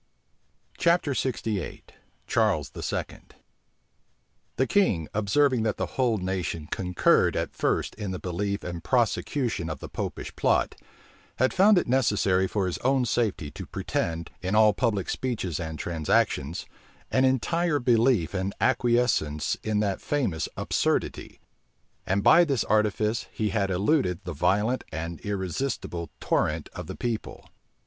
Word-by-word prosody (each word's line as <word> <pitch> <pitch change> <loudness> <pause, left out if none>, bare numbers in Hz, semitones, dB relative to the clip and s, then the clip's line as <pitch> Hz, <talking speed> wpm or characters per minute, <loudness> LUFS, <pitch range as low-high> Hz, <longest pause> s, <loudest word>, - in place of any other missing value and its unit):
CHAPTER 170 -3 +3
LXVIII. 115 - -2 0.4
CHARLES - - +1
II. - - -8
{1679.} - - -5 1.2
The 130 - +2
king, 105 - +2
observing 120 +5 +2
that 110 -1 0
the - - -3
whole 120 -4 +2
nation 90 -4 -3
concurred 90 +1 +2
at - - -2
first - - 0
in 105 -3 -5
the 95 - -3
belief 100 +3 -3
and 85 -2 -6
prosecution 120 - 0
of 75 - -5
the - - -7
Popish - - -5
plot, - - +2 0.6
had 130 - +2
found 200 +2 +6
it 175 - +2
necessary 105 -7 +2
for 100 0 -1
his 90 - -3
own 130 0 +2
safety 105 -10 -1
to - - -8
pretend, 85 0 -3
in 95 +2 -1
all 110 -1 +6
public 110 -7 0
speeches 105 - -2
and 80 -2 -5
transactions, 80 -2 0 0.5
an 130 - +3
entire 150 +5 +2
belief 120 - +2
and 95 +1 -2
acquiescence 120 - +1
in 105 -1 0
that 100 -2 -1
famous 105 - -1
absurdity; - - -1 0.7
and 100 +1 +1
by 175 - +7
this 140 -8 +1
artifice 110 +1 +1
he 110 -1 -1
had 100 -1 0
eluded 95 - +1
the 90 -2 -5
violent 105 - +1
and 80 +1 -5
irresistible 95 -2 -3
torrent 75 0 0
of - - -7
the 95 - -6
people. 115 -3 -4
105 Hz, 140 wpm, -26 LUFS, 90-125 Hz, 1.2 s, by